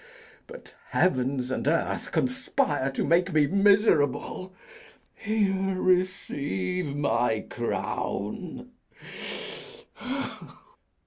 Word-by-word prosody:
but 485 +1 -12
heavens 130 -6 +1
and 130 - -2
earth 165 +2 0
conspire 255 - 0
To 135 - -2
make 175 +3 +3
me 155 -2 +4
miserable. 195 - +3 0.6
Here, 195 -3 0
receive 180 - 0
my 120 -6 +1
crown. 120 - -3
180 Hz, 70 wpm, -27 LUFS, 135-195 Hz, 0.6 s, me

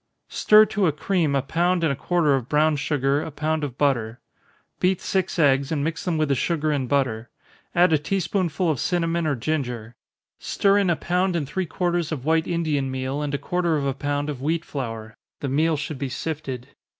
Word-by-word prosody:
_ - - -16
Stir 215 0 +6
to 205 -3 0
a - - +3
cream 155 -1 0
a 135 - +1
pound 175 +4 +1
and 155 -4 +2
a - - -4
quarter 165 0 +1
of 130 -2 -1
brown 155 +1 +3
sugar, 140 0 0
a - - -5
pound 155 +1 -2
of 135 -3 -4
butter 120 -5 0 0.6
beat 185 0 +2
six 190 -1 -1
eggs, 140 -3 +3
and 145 -3 0
mix 165 +2 -3
them 175 -3 0
with 155 -1 +1
the - - +3
sugar 155 +3 0
and 135 -4 -1
butter 120 -5 0 0.5
add 175 -1 +5
a 155 - +4
tea 195 +7 -1
spoonful 185 -1 -1
of 145 - -3
cinnamon 170 -2 0
or 145 - +1
ginger 120 -4 -3 0.5
stir 200 0 +2
in 195 -3 +2
a 170 - +3
pound 180 +2 0
and 150 -5 -1
three 185 +5 -2
quarters 175 -1 -1
of 140 -4 -4
white 160 0 +2
Indian 155 -6 0
meal, 130 +2 -3
and 145 -1 -2
a - - 0
quarter 175 0 0
of 140 - -2
a 135 - 0
pound 145 +1 -2
of 140 -4 -5
wheat 160 +3 -1
flour, 115 -5 -5 0.2
(the 140 - -3
meal 155 +3 +2
should 150 -1 -5
be 135 -1 -2
sifted.) 135 -3 -5
150 Hz, 215 wpm, -24 LUFS, 140-170 Hz, 0.6 s, Stir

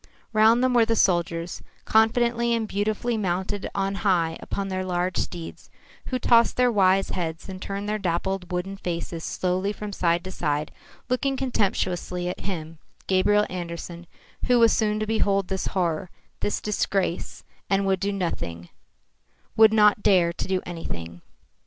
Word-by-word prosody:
Round 220 +3 +5
them 255 -1 +3
were 240 -1 +5
the 225 0 +1
soldiers, 170 -3 +1 0.2
confidently 235 +1 +3
and 225 -1 -2
beautifully 215 +3 -1
mounted 190 0 -2
on 195 0 0
high 170 -5 +2
upon 200 -1 -4
their 185 0 -2
large 180 0 -1
steeds, 170 -2 -5 0.4
who 255 - -1
tossed 235 -2 +4
their 250 -1 +4
wise 195 -2 +3
heads 165 -2 -4
and 185 -1 -8
turned 200 +1 -4
their 215 0 -1
dappled 185 0 -2
wooden 185 +2 -3
faces 170 -2 -4
slowly 185 +2 -1
from 210 -1 -6
side 170 -2 +1
to 185 - -6
side, 150 -4 -2 0.4
looking 265 +2 0
contemptuously 185 -7 -1
at - - -5
him, 165 -4 -5 0.3
Gabriel 205 +2 +3
Andersen, 170 -1 -6 0.4
who 250 -1 +5
was 230 -2 +5
soon 215 -1 +1
to 215 - -1
behold 200 -3 +1
this 190 -1 -2
horror, 175 -1 -1 0.3
this 205 - -1
disgrace, 195 -3 -1 0.3
and 195 0 +2
would 190 -1 +1
do 200 +2 -1
nothing, 85 - -4 0.9
would 220 -1 +7
not 210 -1 +5
dare 175 -4 +4
to - - -4
do 190 -1 0
anything. 85 - -6
195 Hz, 155 wpm, -25 LUFS, 175-215 Hz, 0.9 s, would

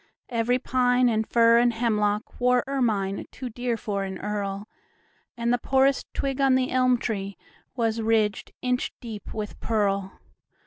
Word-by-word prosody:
Every 235 +1 +1
pine 250 -1 +2
and 220 -1 0
fir 230 0 +5
and 240 0 +4
hemlockWore 225 +2 +1
ermine 215 -8 -1
too 250 -2 -7
dear 245 0 -2
for 200 -2 -3
an 190 -1 -5
earl, 205 0 -4 0.7
And 235 +1 +1
the 245 - +1
poorest 265 +2 +2
twig 275 0 -1
on 270 -1 +4
the 260 0 +1
elm 255 -1 +3
treeWas 220 +2 -4
ridged 220 -2 +1
inch 250 0 0
deep 225 -4 -8
with 210 -1 -6
pearl. 200 -3 -1
230 Hz, 140 wpm, -25 LUFS, 210-250 Hz, 0.7 s, fir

